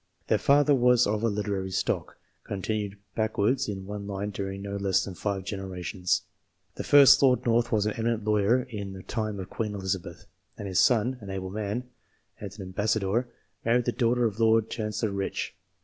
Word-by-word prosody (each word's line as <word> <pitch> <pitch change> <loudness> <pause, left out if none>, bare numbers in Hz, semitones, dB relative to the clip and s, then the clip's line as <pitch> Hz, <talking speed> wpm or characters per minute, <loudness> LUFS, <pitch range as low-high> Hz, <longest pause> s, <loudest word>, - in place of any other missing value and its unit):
Their - - +3
father 145 +1 +4
was 125 -2 +4
of 105 +1 0
a 115 - +2
literary 100 -3 -2
stock, 95 - -2 0.3
con 100 -2 -5
tinued 105 -2 -2 0.2
backwards 110 +3 0
in 95 -2 -5
one 100 0 -6
line 100 +1 -3
during 95 0 -5
no 100 0 -4
less 100 -2 +1
than 95 - -6
five 95 +1 -3
generations. 95 -2 -2 0.5
The - - -5
first 140 -2 +7
Lord 130 -2 +4
North 120 0 +2
was 105 -2 +2
an 105 - +1
eminent 115 -1 -1
lawyer 105 +4 +2
in 100 -5 -6
the 95 -1 -9
time 110 -3 -3
of 95 0 -7
Queen 105 -2 -3
Elizabeth, 95 -3 -4 0.3
and 100 - -6
his 95 -1 +1
son 125 +1 +3
an 100 - -9
able 95 -1 -4
man 105 +3 -3 0.6
and 100 -2 -6
an 100 - -7
ambassador 105 +4 0 0.4
married 120 +1 +2
the - - +1
daughter 120 0 +1
of 110 -1 -2
Lord 115 -1 +3
Chan 105 -2 -3
cellor 110 -2 -1
Rich. 100 0 -3
105 Hz, 190 wpm, -27 LUFS, 95-115 Hz, 0.6 s, first